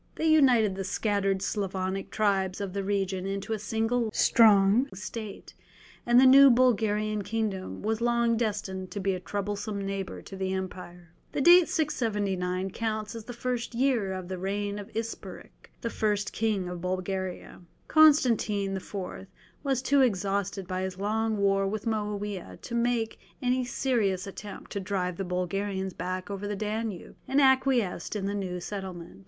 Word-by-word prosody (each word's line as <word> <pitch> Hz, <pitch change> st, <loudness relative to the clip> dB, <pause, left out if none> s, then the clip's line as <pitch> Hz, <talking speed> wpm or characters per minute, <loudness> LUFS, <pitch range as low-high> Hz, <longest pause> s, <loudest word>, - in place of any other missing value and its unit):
They -, -, -2 dB
united 255 Hz, -10 st, +5 dB
the 195 Hz, 0 st, -4 dB
scattered 195 Hz, -1 st, 0 dB
Slavonic 190 Hz, -1 st, -2 dB
tribes 195 Hz, -3 st, 0 dB
of 200 Hz, -2 st, -4 dB
the 200 Hz, 0 st, -2 dB
region 195 Hz, -1 st, -1 dB
into 195 Hz, +3 st, -3 dB
a 215 Hz, -, -2 dB
single 225 Hz, +3 st, 0 dB
strong 215 Hz, +4 st, +5 dB
state, 210 Hz, +2 st, -7 dB, 0.5 s
and 240 Hz, +1 st, +6 dB
the 265 Hz, -, +7 dB
new 275 Hz, +1 st, +9 dB
Bulgarian 215 Hz, -4 st, +2 dB
kingdom 205 Hz, -2 st, -3 dB
was 220 Hz, +1 st, -1 dB
long 235 Hz, -1 st, +2 dB
destined 205 Hz, -4 st, -2 dB
to 205 Hz, -, -5 dB
be 195 Hz, 0 st, 0 dB
a 185 Hz, -, -3 dB
troublesome 205 Hz, +2 st, -3 dB
neighbour 195 Hz, -1 st, -4 dB
to 195 Hz, -, -9 dB
the 190 Hz, 0 st, -2 dB
empire. 180 Hz, -2 st, -7 dB, 0.2 s
The -, -, 0 dB
date 350 Hz, +3 st, +7 dB
679 195 Hz, -, -1 dB
counts 215 Hz, 0 st, -3 dB
as 225 Hz, -2 st, -8 dB
the 245 Hz, -, -7 dB
first 240 Hz, 0 st, -3 dB
year 240 Hz, -6 st, +1 dB
of 185 Hz, -1 st, -5 dB
the 185 Hz, 0 st, -5 dB
reign 200 Hz, +2 st, -2 dB
of 205 Hz, +1 st, -8 dB
Isperich 225 Hz, 0 st, -7 dB, 0.2 s
first 210 Hz, -2 st, -1 dB
king 210 Hz, -5 st, 0 dB
of 180 Hz, -1 st, -6 dB
Bulgaria. 185 Hz, 0 st, -4 dB, 0.3 s
Constantine 235 Hz, -10 st, +4 dB
IV. 190 Hz, +2 st, -8 dB, 0.7 s
was 270 Hz, -3 st, 0 dB
too 280 Hz, +1 st, +4 dB
exhausted 200 Hz, -4 st, 0 dB
by 185 Hz, 0 st, -2 dB
his 190 Hz, -1 st, -4 dB
long 220 Hz, +2 st, 0 dB
war 195 Hz, -1 st, +2 dB
with 210 Hz, +1 st, -3 dB
Moawiah 205 Hz, -, -3 dB
to -, -, -8 dB
make 235 Hz, -1 st, 0 dB, 0.2 s
any 255 Hz, 0 st, +1 dB
serious 220 Hz, -7 st, 0 dB
attempt 195 Hz, +1 st, -9 dB
to 200 Hz, -, -2 dB
drive 185 Hz, -2 st, -2 dB
the 195 Hz, -, -2 dB
Bulgarians 190 Hz, +1 st, -2 dB
back 185 Hz, +2 st, -4 dB
over 200 Hz, +1 st, -4 dB
the 205 Hz, -, -2 dB
Danube, 215 Hz, -2 st, -4 dB
and 270 Hz, +2 st, +2 dB
acquiesced 260 Hz, -9 st, +2 dB
in 200 Hz, -2 st, -2 dB
the 200 Hz, -, -1 dB
new 185 Hz, -3 st, -3 dB
settlement. 180 Hz, -, -7 dB
205 Hz, 160 wpm, -28 LUFS, 190-230 Hz, 0.7 s, new